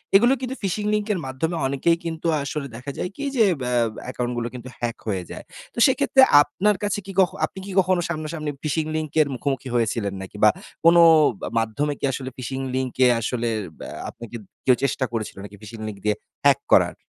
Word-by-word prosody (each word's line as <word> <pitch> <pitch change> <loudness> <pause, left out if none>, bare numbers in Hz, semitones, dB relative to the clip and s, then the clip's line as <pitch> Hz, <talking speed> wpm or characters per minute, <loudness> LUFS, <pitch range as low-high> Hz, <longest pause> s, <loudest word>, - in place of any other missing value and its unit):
এগুলো 240 +6 +6
কিন্তু 260 +1 -3
phishing 210 +2 -1
লিঙ্কের 210 -3 0
মাধ্যমে 145 +6 -2
অনেকেই 165 +5 +2
কিন্তু 165 0 -3 0.2
আসলে 140 0 -4
দেখা 130 +4 -6
যায় 180 - -2
কি 285 - -6
যে 225 - +6 0.2
ব্যা 125 0 -1 0.3
অ্যাকাউন্ট 125 -1 -3
গুলো 120 0 -1
কিন্তু 125 0 -8
হ্যাক 120 -1 -2
হয়ে 95 -4 -1
যায়। - - -8 0.3
তো - - -22
সেক্ষেত্রে 265 0 +4 0.2
আপনার 195 +8 +1
কাছে 205 0 0
কি 195 - -7
কখ 180 -3 +5 0.2
আপনি 190 - -10
কি 200 - -7
কখনো 185 -1 +2
সামনা-সামনি 155 -1 -3
phishing 155 +1 -1
লিঙ্কের 155 -1 +1
মুখোমুখি 135 -1 -3
হয়েছিলেন 110 -3 0
নাকি? 95 +2 -9
বা 105 - +9 0.4
কোন 170 +1 +7 0.5
আ - - -4
মাধ্যমে 140 +7 -1
কি - - -1
আসলে 130 0 -4
phishing 130 +1 -4
লিংকে 130 0 +1
আসলে 120 +1 -2 0.3
ব্যা - - -7 0.2
আপনাকে 120 0 -10 0.3
কেউ 130 -2 +6
চেষ্টা 135 -1 +1
করেছিল 110 -2 -3
নাকি 100 0 -10
phishing 110 +1 -9
লিঙ্ক 105 -2 -6
দিয়ে 105 -1 +2 0.3
হ্যাক 140 -1 +6
করার? - - +5
140 Hz, 190 wpm, -23 LUFS, 120-170 Hz, 0.5 s, বা